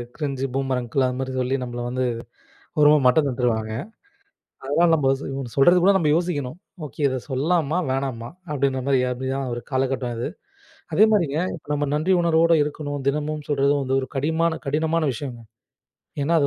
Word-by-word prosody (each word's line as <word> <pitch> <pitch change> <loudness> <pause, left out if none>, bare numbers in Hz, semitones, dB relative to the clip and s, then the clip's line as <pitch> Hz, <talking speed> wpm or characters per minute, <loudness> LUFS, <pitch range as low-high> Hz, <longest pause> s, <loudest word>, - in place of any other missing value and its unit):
Cringe 140 -4 -3
boomer 135 -1 0
uncle 125 +2 0
அது 125 - -3
மாதிரி 130 0 -3
சொல்லி 130 +1 0
நம்மள 120 -1 -5
வந்து, 130 +1 -1 0.7
ஒரு 150 - +7
மாதிரி 150 -2 +4
மட்டம் 145 +4 +4
தட்டுவாங்க. 115 -4 -1 0.9
அதனால் 165 +5 +3
நமக்கு 135 -3 +2
சொ - - -7 0.3
சொல்கிறது 175 +6 +6
கூட 195 +3 +6
நமக்கு 155 -5 +3
யோசிக்கவேண்டும். 155 -6 -2 0.3
ஓகே 135 +1 -12
இதை 130 -1 -2
சொல்லலாமா, 155 +4 +1
வேணாமா 130 -3 -2 0.2
அப்படின்ற 135 -2 0
மாதிரி 135 -2 +3
அப்படித்தான் 130 +1 -3
ஒரு 120 - -5
காலகட்டம் 130 -2 -1
இது. 120 - -2 0.7
அதே 215 - +6
மாதிரிங்க 165 -8 +1 0.2
இப்போ 155 - -17
நாம் 145 -1 -1
நன்றி 160 +6 +2
உணர்வோட 165 0 +4
இருக்கவேண்டும். 145 -1 -4
தினமும் 150 +1 -2
சொல்கிறது 140 -1 +2
வந்து 135 0 0
ஒரு 130 - -6
கடிமான 160 +4 +1
கடினமான 160 +3 0
விஷயங்க. 125 -1 -6 0.8
ஏன் - - 0
என்றால் 170 0 +4
அது 140 - +3
140 Hz, 170 wpm, -23 LUFS, 130-155 Hz, 0.9 s, ஒரு